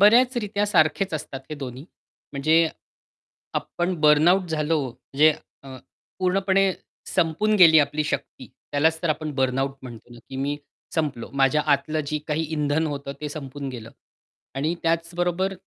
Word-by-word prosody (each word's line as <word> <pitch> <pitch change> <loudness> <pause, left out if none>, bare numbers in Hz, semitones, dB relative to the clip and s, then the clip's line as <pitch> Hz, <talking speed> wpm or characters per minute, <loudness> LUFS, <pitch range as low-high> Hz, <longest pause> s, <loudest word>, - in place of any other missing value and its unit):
बऱ्याच 245 +5 +6
रित्या 205 -2 -1
सारखेच 165 0 +2
असतात 140 -3 -5
हे - - -3
दोन्ही. 135 -2 -7 0.5
म्हणजे 160 +4 +3 0.9
आपण 175 +2 -2
बर्नआउट 165 +5 +5
झालो 155 0 0
म्हणजे 150 +6 +2 0.3
अ, 130 -1 -9 0.4
पूर्णपणे 190 +1 +2 0.4
संपून 185 +5 +1
गेली 165 -5 +8
आपली 150 +1 +1
शक्ती. - - -4 0.2
त्यालाच 160 +3 +2
तर 170 - 0
आपण 155 0 -2
बर्नआउट 135 +1 0
म्हणतो 120 -1 -11
ना, 120 - -13
की 135 - -7
मी 140 +2 -2 0.4
संपलो. 145 -7 -2
माझ्या 135 +2 +3
आतलं 155 +3 -1
जे 150 +1 -1
काही 155 +1 0
इंधन 150 +1 +1
होतं 140 -2 -5
ते 150 - -3
संपून 140 -2 -6
गेलं. 115 -3 -8 0.7
आणि 150 +5 0
त्याचबरोबर 175 +3 0
155 Hz, 140 wpm, -24 LUFS, 140-175 Hz, 0.9 s, गेली